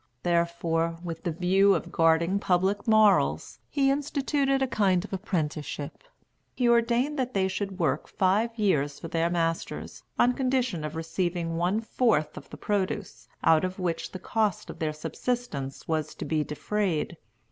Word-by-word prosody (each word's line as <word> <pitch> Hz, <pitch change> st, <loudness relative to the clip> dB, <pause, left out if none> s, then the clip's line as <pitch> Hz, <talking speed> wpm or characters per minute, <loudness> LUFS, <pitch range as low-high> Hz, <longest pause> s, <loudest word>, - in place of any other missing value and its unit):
Therefore, 170 Hz, -1 st, 0 dB
with 165 Hz, -2 st, -5 dB
the 170 Hz, -, +1 dB
view 190 Hz, +4 st, +4 dB
of 165 Hz, -, -4 dB
guarding 165 Hz, +4 st, +3 dB
public 190 Hz, +2 st, +1 dB
morals, 215 Hz, -2 st, +3 dB
he 275 Hz, -1 st, +2 dB
instituted 280 Hz, -1 st, 0 dB
a -, -, +1 dB
kind 195 Hz, -6 st, +2 dB
of 210 Hz, -, -10 dB
apprenticeship. 155 Hz, -6 st, -3 dB, 0.5 s
He 245 Hz, -, +1 dB
ordained 235 Hz, +5 st, +2 dB
that 255 Hz, -2 st, -2 dB
they 190 Hz, -1 st, +2 dB
should 195 Hz, 0 st, -3 dB
work 165 Hz, -4 st, 0 dB
five 200 Hz, +5 st, +2 dB
years 145 Hz, -9 st, +1 dB
for 165 Hz, -, -7 dB
their 165 Hz, +1 st, +1 dB
masters, 165 Hz, -1 st, -2 dB, 0.2 s
on 245 Hz, -, +4 dB
condition 255 Hz, -, 0 dB
of 155 Hz, +1 st, -5 dB
receiving 165 Hz, +1 st, -2 dB
one 180 Hz, +6 st, +1 dB
fourth 225 Hz, -9 st, +1 dB
of -, -, -10 dB
the -, -, -9 dB
produce, 205 Hz, -1 st, -2 dB, 0.2 s
out 160 Hz, 0 st, +5 dB
of 185 Hz, 0 st, -2 dB
which 175 Hz, -3 st, -2 dB
the -, -, -6 dB
cost 210 Hz, 0 st, -1 dB
of -, -, -13 dB
their 155 Hz, -1 st, 0 dB
subsistence 155 Hz, -, -4 dB
was 155 Hz, -2 st, -2 dB
to -, -, -6 dB
be 155 Hz, -1 st, 0 dB
defrayed. 170 Hz, +1 st, -2 dB
185 Hz, 160 wpm, -27 LUFS, 165-220 Hz, 0.5 s, out